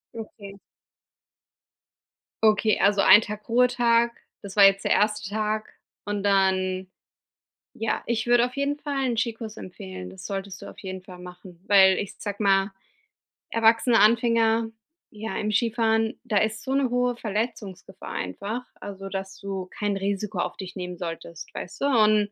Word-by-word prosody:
Okay. 200 -3 -9 1.8
Okay, 215 0 +3
also 200 +1 +3
ein 195 +2 +8
Tag 210 +1 -8
Ruhetag, 235 -1 +3 0.3
das 200 -1 -9
war 205 - +7
jetzt 195 0 +5
der - - +1
erste 210 -1 +1
Tag 215 +1 -2 0.3
und 205 -1 -3
dann 190 -1 +1 0.9
ja, 225 - -2
ich 230 -1 -1
würde 240 0 +5
auf 250 - -7
jeden 280 +1 -1
Fall 285 -2 -3
'n 240 -3 -1
Skikurs 225 -2 -3
empfehlen. 95 - -8
Das 95 - -11
solltest 195 -1 -5
du - - -9
auf - - -14
jeden 190 -1 -7
Fall 185 -1 -12
machen 180 -1 -12
weil 190 -2 +6
ich 200 - -4
sag 205 -1 -5
mal, 195 -1 +2 0.8
erwachsene 230 +1 +4
Anfänger, 225 0 +3 0.4
ja 210 -2 -6
im 215 - -1
Skifahren, 225 0 +1
da 220 -4 0
ist 215 +1 0
so 265 +1 -2
'ne 275 -2 +2
hohe 245 0 +1
Verletzungsgefahr 210 -4 -5
einfach 205 - -4
also 195 -1 -8
dass 195 0 -6
du 195 -2 -5
kein 205 -1 -1
Risiko 200 +1 -3
auf - - -2
dich 185 -1 -8
nehmen 180 -1 -5
solltest, 170 -1 -7
weißte. 235 +10 -4
Und 215 -5 +3
210 Hz, 155 wpm, -25 LUFS, 195-230 Hz, 1.8 s, ein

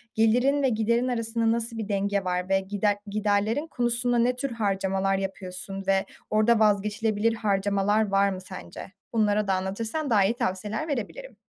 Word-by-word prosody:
gelirin 250 +6 +3
ve 265 - +4
giderin 235 +2 +1
arasında 230 -2 0
nasıl 230 0 -2
bir 220 -2 -4
denge 200 0 0
var? 180 0 -2
Ve 195 0 +3
gider 205 +1 0
giderlerin 210 +7 0
konusunda 240 -2 0
ne 245 +2 +2
tür 270 +1 -3
harcamalar 195 -3 0
yapıyorsun 195 0 -5
ve 195 0 +2 0.2
orada 215 +2 +3
vazgeçilebilir 210 +1 +2
harcamalar 205 0 +1
var 200 0 +3
mı 185 -1 -5
sence? 185 0 -9 0.2
Bunları 210 -2 +2
da 195 - +2
anlatırsan 220 +10 -2
daha 205 -4 +4
iyi 210 - +2
tavsiyeler 210 +7 -2
verebilirim. 310 - -5
210 Hz, 155 wpm, -26 LUFS, 195-230 Hz, 0.2 s, ve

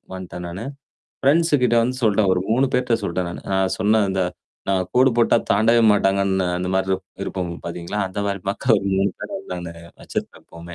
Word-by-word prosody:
வந்ட்டேன் 90 -1 -7
நானு. 95 +6 -6 0.6
ஃப்ரெண்ட்ஸ் 165 +4 +3
கிட்ட 120 -1 +3
வந்து 125 +2 -1
சொல்ட்டேன் 105 -2 +3
ஒரு 90 - 0
3 130 +4 +3
பேர்ட்ட 125 -2 +2
சொல்ட்டேன் 90 +1 -2
நானு. 85 - -7
நான் 95 -1 +1
சொன்னே 110 +2 +3
இந்த 95 0 -1 0.5
நான் 95 -2 +1
கோடு 130 +1 +5
போட்டா 115 - +4
தாண்டவே 115 +3 +4
மாட்டாங்கன்னு 95 -2 +2
அந்த 90 0 -3
மாரி 95 0 0
இருப் 95 0 -1 0.2
இருப்போம் 90 -3 -3
பார்த்தீங்களா, 85 +4 -5
அந்த 95 +2 -7
மாரி 100 -2 -2
மக்க 100 - -3
ஒரு 100 - -3
3 95 +1 +2
பேர - - -7
வந்து 195 0 -8
நாங்க 85 -1 -6 0.3
வச்சிருப்போம் - - -6
எப்போமே. 85 +1 -11
95 Hz, 190 wpm, -22 LUFS, 90-115 Hz, 0.6 s, கோடு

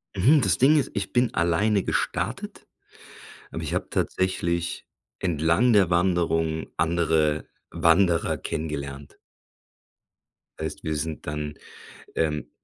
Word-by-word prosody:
Mhm, 130 +11 +5
das 95 -6 +2
Ding 145 +5 +5
ist, - - -2
ich 100 -2 -3
bin 120 0 +2
alleine 100 +4 +2
gestartet, - - -3 0.8
aber - - -5
ich - - -4
habe - - -1
tatsächlich, 85 -2 -1 0.3
entlang 85 +7 +2
der 100 -5 +4
Wanderung, 85 -3 +1
andere 80 -2 +1 0.3
Wanderer 85 0 +3
kennengelernt. 70 -3 -5 1.4
Heißt, 80 -1 -5
wir 80 -1 -2
sind 75 +1 -4
dann, 75 0 -4 0.6
ähm 75 -2 -1
85 Hz, 110 wpm, -25 LUFS, 80-95 Hz, 1.4 s, Mhm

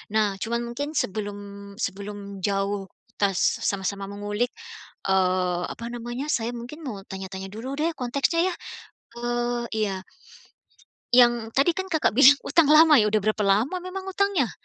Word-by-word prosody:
Nah 205 -3 +1
cuma 235 +1 -2
mungkin 285 +6 -5
sebelum 205 -2 -2 0.4
sebelum 200 -2 -5
jauh, 195 0 -1 0.2
kita 200 -2 0 0.3
sama-sama 195 0 -2
mengulik, 205 +3 -2 0.6
eee, 185 -2 +1
apa 230 - -7
namanya, 240 +5 -4
saya 235 -1 -1
mungkin 240 +6 -8
mau 200 -6 -6
tanya-tanya 190 0 -7
dulu 240 +6 -5
deh 315 +4 0
konteksnya 280 +8 +1
ya, 365 - -2 0.7
eee, 240 0 -1 0.2
iya. 195 -3 -1 1.1
Yang 240 -2 +5
tadi 330 +5 +4
kan 380 +1 -4
Kakak 315 - +1
bilang 275 +3 +8
utang 320 -4 +4
lama 310 0 +8
ya, 215 -6 +5
udah 215 - +3
berapa 215 +1 0
lama 210 - +2
memang 375 +1 -6
utangnya? 385 - +1
230 Hz, 145 wpm, -25 LUFS, 200-275 Hz, 1.1 s, bilang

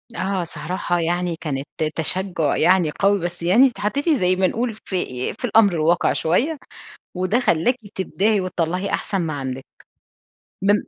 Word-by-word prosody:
آه، 190 -1 -1
صراحة 175 +2 -1
يعني 175 +1 -1
كانت 140 -2 -3 0.3
تشجُّع 170 -2 0
يعني 175 -2 +3
قوي، 200 0 +3
بس 175 -1 -5
يعني 215 +10 +6
اتحطيتِ 245 - -2
زي 185 - +3
ما 185 0 +2
نقول 230 +2 -2
ف 210 - -13
آآ، 125 -9 -2
في - - -2
الأمر 215 -4 +4
الواقع 165 +1 +2
شوية، 250 - 0 0.6
وده 185 +6 +1
خلّاكِ 175 +3 +2 0.2
تبدعِي 200 +2 0
وتطلَّعي 185 +1 -2
أحسن 195 - -2
ما 165 -2 -2
عندِك، 135 -1 -5 1.0
من 205 +1 +4
185 Hz, 150 wpm, -21 LUFS, 165-205 Hz, 1.0 s, يعني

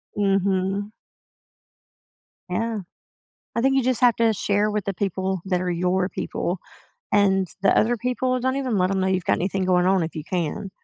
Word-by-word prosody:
Mhm. 195 0 0 1.6
Yeah. 225 +4 -1 0.8
I 230 - +1
think 270 +1 +3
you 270 - +3
just 255 0 0
have 245 -3 +5
to 230 -1 +3
share 205 +1 +1
with 210 -2 -2
the 200 - -1
people 190 -1 -2
that 180 -2 0
are 180 - -1
your 180 +2 0
people. 175 +1 -3 0.5
And 195 -3 +3
the 195 - +4
other 240 +3 +3
people, 250 +2 -1
don't 260 +2 0
even 255 -6 -1
let 185 0 +2
'em 195 -1 0
know 190 - +1
you've 185 -2 0
got - - +2
anything 190 +1 -1
going 180 -1 +3
on 190 -1 +3
if 160 - -4
you 155 -1 -5
can. 180 +2 -3
195 Hz, 185 wpm, -23 LUFS, 185-225 Hz, 1.6 s, have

